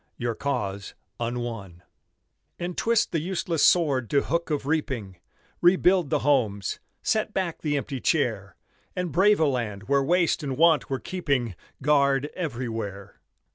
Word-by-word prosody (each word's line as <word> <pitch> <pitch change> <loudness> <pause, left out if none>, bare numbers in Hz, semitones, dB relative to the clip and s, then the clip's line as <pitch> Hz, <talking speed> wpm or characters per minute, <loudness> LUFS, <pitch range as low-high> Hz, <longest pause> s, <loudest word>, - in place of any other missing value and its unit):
Your 120 -1 -1
cause 100 -7 -3 0.2
unwon, 115 -7 -4 0.7
And 175 0 -4
twist 230 -1 +1
the 165 - 0
useless 170 -1 -1
sword 140 -9 +3
to 140 - +2
hook 170 0 -1
of 145 -3 -1
reaping, 130 - -2 0.4
Rebuild 180 -2 +4
the - - +1
homes, 110 -9 +1 0.2
set 215 -1 0
back 185 -4 -2
the 145 -2 0
empty 135 -2 -4
chair 110 - 0 0.4
And 180 -2 -2
brave 205 +4 +4
a 160 - +4
land 115 -8 -2
where 140 +4 +2
waste 170 +4 +2
and 135 -3 -3
want 165 -2 +4
were 135 - -1
keeping 140 - -2 0.3
Guard 140 -1 +3
everywhere. 115 - -5
140 Hz, 140 wpm, -26 LUFS, 120-170 Hz, 0.7 s, Rebuild